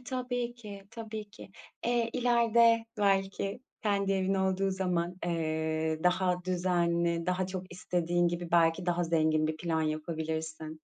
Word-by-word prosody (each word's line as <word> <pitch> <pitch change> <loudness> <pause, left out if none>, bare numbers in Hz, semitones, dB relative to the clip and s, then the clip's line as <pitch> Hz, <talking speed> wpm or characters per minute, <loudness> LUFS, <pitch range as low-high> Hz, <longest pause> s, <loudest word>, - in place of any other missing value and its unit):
E, - - -20
tabii 245 -2 -3
ki, 210 -4 -10
tabii 220 -2 -7
ki. 210 - -12 0.4
Eee, 235 -1 +1
ileride 235 -1 +4
belki 195 +1 +1 0.2
kendi 200 -2 +1
evin 195 0 +1
olduğu 190 0 +1
zaman, 180 -2 -1
eee, 160 -1 -1
daha 180 0 +2
düzenli, 170 -2 +1
daha 180 +1 0
çok 185 -1 -6
istediğin 175 -1 0
gibi, 175 0 -4
belki 170 +1 +3
daha 175 0 +1
zengin 155 -2 +2
bir 155 0 -2
plan 160 -1 -1
yapabilirsin. 160 0 -3
180 Hz, 135 wpm, -30 LUFS, 165-200 Hz, 0.4 s, ileride